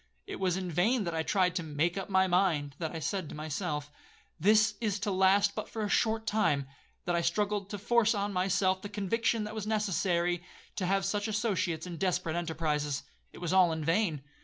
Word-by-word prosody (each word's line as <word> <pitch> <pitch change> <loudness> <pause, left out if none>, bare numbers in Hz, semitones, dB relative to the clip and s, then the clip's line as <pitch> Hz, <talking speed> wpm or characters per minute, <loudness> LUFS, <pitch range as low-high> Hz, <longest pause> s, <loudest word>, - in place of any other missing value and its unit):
It - - -7
was 185 -2 +1
in 185 -2 -4
vain 210 +9 +2
that 170 -3 -3
I 160 - 0
tried 180 +1 +2
to - - -1
make 160 +2 -1
up 195 0 -4
my 190 -1 +4
mind,—that 165 -4 0
I 165 - -5
said 165 +1 -3
to - - -8
myself, 150 -1 -3 0.5
'This 210 +4 +4
is 210 -3 0
to 205 - -1
last 195 +2 +4
but - - -5
for 220 - -4
a 205 - -2
short 220 +1 +1
time,'—that 145 -4 -1
I 170 - +2
struggled 205 +2 0
to 205 - -4
force 225 +2 +2
on 205 0 -1
myself 185 0 +1
the 205 - -6
conviction 220 +2 0
that 210 - -5
it - - -9
was 215 -1 -4
necessary 180 -5 0 0.4
to 185 - -1
have 195 +1 +1
such 205 +2 -1
associates 205 -7 -1
in 175 -2 -6
desperate 170 -3 0
enterprises;—it 150 -4 -3
was 175 0 -2
all 185 -3 +5
in 160 -1 -3
vain. 165 -4 +1
185 Hz, 200 wpm, -30 LUFS, 165-205 Hz, 0.5 s, all